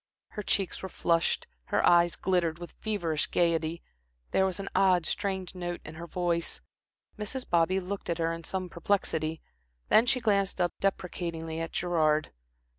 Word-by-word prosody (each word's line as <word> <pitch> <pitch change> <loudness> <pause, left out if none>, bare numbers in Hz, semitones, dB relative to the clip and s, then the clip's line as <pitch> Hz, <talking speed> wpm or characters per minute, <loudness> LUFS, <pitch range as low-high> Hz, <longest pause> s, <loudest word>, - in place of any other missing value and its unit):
Her 210 - -5
cheeks 195 -2 0
were 190 - -5
flushed, 170 -1 +1 0.2
her - - +1
eyes 175 -1 +5
glittered 175 -3 +1
with 175 0 -8
feverish 175 -8 -1
gaiety, 165 -1 +1 0.5
there 190 - +3
was 190 +1 -3
an 195 - -5
odd, 185 -3 +4
strained 190 0 -2
note 175 -1 -4
in 155 - -8
her 170 +2 -8
voice. 170 -1 -1 0.6
Mrs. 250 +5 -4
Bobby 175 +2 +3
looked 190 +1 -5
at 170 - 0
her 165 0 0
in 165 0 -7
some 185 +2 -3
perplexity, 165 -3 -1 0.5
then 225 +3 +6
she 255 0 +3
glanced 200 -5 +1
up 175 -1 +2
deprecatingly 170 -4 -2
at 165 -1 -3
Gerard. 155 -3 +1
175 Hz, 160 wpm, -29 LUFS, 165-190 Hz, 0.6 s, then